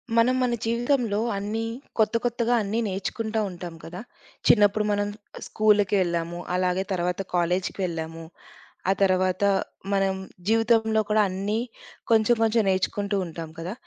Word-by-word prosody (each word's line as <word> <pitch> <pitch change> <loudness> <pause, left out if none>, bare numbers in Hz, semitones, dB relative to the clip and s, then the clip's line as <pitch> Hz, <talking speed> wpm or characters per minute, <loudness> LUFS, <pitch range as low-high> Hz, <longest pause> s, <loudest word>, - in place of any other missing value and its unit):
మనం 240 +2 +4
మన 245 -1 +1
జీవితంలో 235 -1 +1 0.2
అన్నీ 210 +3 -2 0.4
కొత్త, 220 +1 +3
కొత్తగా 240 0 +1
అన్నీ 210 +3 -1
నేర్చుకుంటా 215 +3 -2
ఉంటాం 175 -2 -7
కదా! 175 +3 -7 0.5
చిన్నప్పుడు 210 -1 +5
మనం 205 0 0 0.4
స్కూల్‌కెళ్ళాము. 190 -5 +2 0.2
అలాగే 180 +1 +1
తర్వాత 180 +1 -1
కాలేజ్‌కెళ్ళాము. 170 -2 -1 0.7
ఆ - - +6
తర్వాత 185 0 +2 0.5
మనం 195 -1 +2 0.4
జీవితంలో 225 -1 +3
కూడా 215 0 +4
అన్నీ 200 +4 -2 0.5
కొంచెం, 225 +1 +5
కొంచెం 225 0 +3
నేర్చుకుంటూ 200 +2 0
ఉంటాం 165 -1 -7
కదా! 175 +4 -4
200 Hz, 115 wpm, -25 LUFS, 180-220 Hz, 0.7 s, ఆ